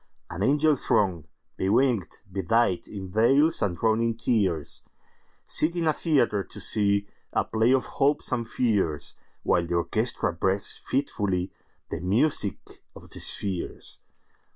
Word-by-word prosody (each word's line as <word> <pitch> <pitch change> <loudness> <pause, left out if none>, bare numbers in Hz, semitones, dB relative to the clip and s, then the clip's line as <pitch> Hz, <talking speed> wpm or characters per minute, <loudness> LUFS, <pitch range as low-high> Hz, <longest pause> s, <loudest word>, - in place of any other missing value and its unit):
An 85 - -5
angel 145 +6 +3
throng, 95 - 0 0.3
bewinged, 110 0 +1
bedightIn 95 -1 0
veils, 135 - +3
and 90 -4 0
drowned 110 0 +2
in 115 -1 0
tears, 95 - -1 0.6
Sit 165 +3 +2
in 170 -1 -1
a 155 - +3
theatre, 130 - +1
to - - -11
seeA 100 -1 +2 0.5
play 110 +2 +3
of 130 -1 +2 0.2
hopes 145 +2 +2
and 115 -1 -1
fears, 95 - 0 0.3
While 85 -1 +1
the 85 - -1
orchestra 85 +3 0
breathes 95 +4 -1
fitfullyThe 100 -14 -3
music 105 - 0
of - - -14
the - - -8
spheres. 95 -4 -3
105 Hz, 125 wpm, -26 LUFS, 95-125 Hz, 0.6 s, angel